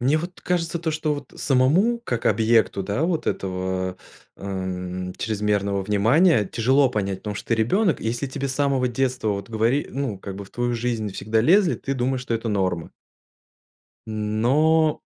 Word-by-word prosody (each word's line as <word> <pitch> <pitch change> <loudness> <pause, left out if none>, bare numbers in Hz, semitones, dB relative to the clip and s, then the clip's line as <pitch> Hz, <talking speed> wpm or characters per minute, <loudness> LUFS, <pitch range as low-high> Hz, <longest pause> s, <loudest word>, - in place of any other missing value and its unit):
Мне 135 +5 +3
вот 175 +3 -7
кажется 170 -1 -1
то, 165 -1 -1
что, 155 -1 -1
вот 145 -1 -9
самому 160 - +3
как 120 - -3
объекту, 110 -2 +3
да, 100 +9 -2
вот, 165 -2 -1
этого, 95 -1 -2 0.4
э, - - -16
м, 90 -1 -4
чрезмерного 105 -2 0
внимания 115 - +4
тяжело 130 +6 +2
понять, 100 -4 -2
потому 105 0 -5
что - - -8
ты 115 - +3
ребенок, 160 - +1
и - - -5
если 120 +4 -1
тебе 135 +1 -4
с 130 - -3
самого 135 -2 +1
детства 125 -1 -1
вот 100 0 -2
говори 115 +6 +1
ну, 135 -8 -3
как 95 0 -7
бы 100 - -7
в 95 - -17
твою 120 0 -1
жизнь 115 -4 -2
всегда 110 +3 0
лезли, 175 - +4
ты 135 - -4
думаешь, 130 0 -1
что 120 - -2
это 115 0 -2
норма. 95 -5 -1 1.2
Но, 130 +10 +2
115 Hz, 175 wpm, -23 LUFS, 100-140 Hz, 1.2 s, внимания